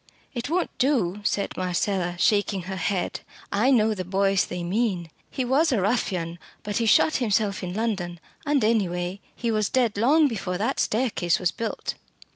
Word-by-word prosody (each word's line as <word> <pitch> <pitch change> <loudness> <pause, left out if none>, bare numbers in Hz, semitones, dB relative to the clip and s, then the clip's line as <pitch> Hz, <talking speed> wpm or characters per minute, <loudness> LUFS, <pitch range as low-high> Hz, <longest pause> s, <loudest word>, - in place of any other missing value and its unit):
"It 245 +1 -4
won't 350 +2 -1
do," 220 -8 +1
said 200 -1 -1
Marcella, 180 0 -1
shaking 200 +1 +2
her 190 +2 -5
head. 185 0 -1 0.3
"I 215 +6 +2
know 220 -4 +4
the 185 -3 -4
Boyce 195 +1 +2
they 180 -1 -5
mean. 180 -3 -1 0.2
He 260 - -2
was 280 +6 +3
a 240 - +2
ruffian, 185 -5 -1 0.2
but 205 -1 -2
he 230 - +1
shot 310 +8 +5
himself 210 -4 0
in 180 0 -5
London; 190 -6 -2 0.2
and, 290 -5 +1
any 215 -4 +2
way, 180 +3 -4
he 235 -2 -1
was 215 -2 +1
dead 240 -5 +1
long 290 +8 +5
before 195 -7 -3
that 210 +4 -1
staircase 205 -7 +1
was 180 -2 0
built." 230 - -4
205 Hz, 175 wpm, -25 LUFS, 180-235 Hz, 0.3 s, shot